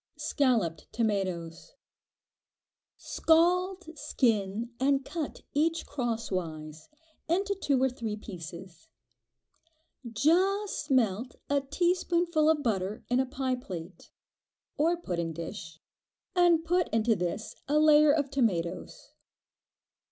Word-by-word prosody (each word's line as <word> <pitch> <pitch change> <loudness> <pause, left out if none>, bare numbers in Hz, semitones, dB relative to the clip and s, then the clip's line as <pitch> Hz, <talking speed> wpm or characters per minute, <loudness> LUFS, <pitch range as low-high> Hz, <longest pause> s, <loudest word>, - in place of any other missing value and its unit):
Scalloped 230 - 0
Tomatoes. 195 - -2 1.2
Scald, 355 +1 +1
skin, 225 -5 0
and 270 0 +2
cut 320 -4 -5
each 325 +3 +1
crosswise, 180 - -4 0.4
into 390 +4 +1
two 290 -9 0
or - - +5
three 230 -4 -4
pieces. 175 -4 -10 1.2
Just 365 - +1
melt 240 -2 +1 0.2
a 285 -1 +3
teaspoonful 340 +1 +1
of 305 -2 +2
butter 205 -2 -1
in 245 +1 +2
a 265 - +1
pie 260 0 -2
plate, 180 -6 -9 0.7
or 330 +4 +2
pudding 170 - -3
dish, 165 -1 -7 0.6
and 345 -2 +4
put 355 +1 +2
into 225 0 +2
this 180 +4 -3
a 295 +2 +2
layer 305 -1 +6
of 290 -2 0
tomatoes. 200 -11 -2
255 Hz, 100 wpm, -29 LUFS, 190-320 Hz, 1.2 s, layer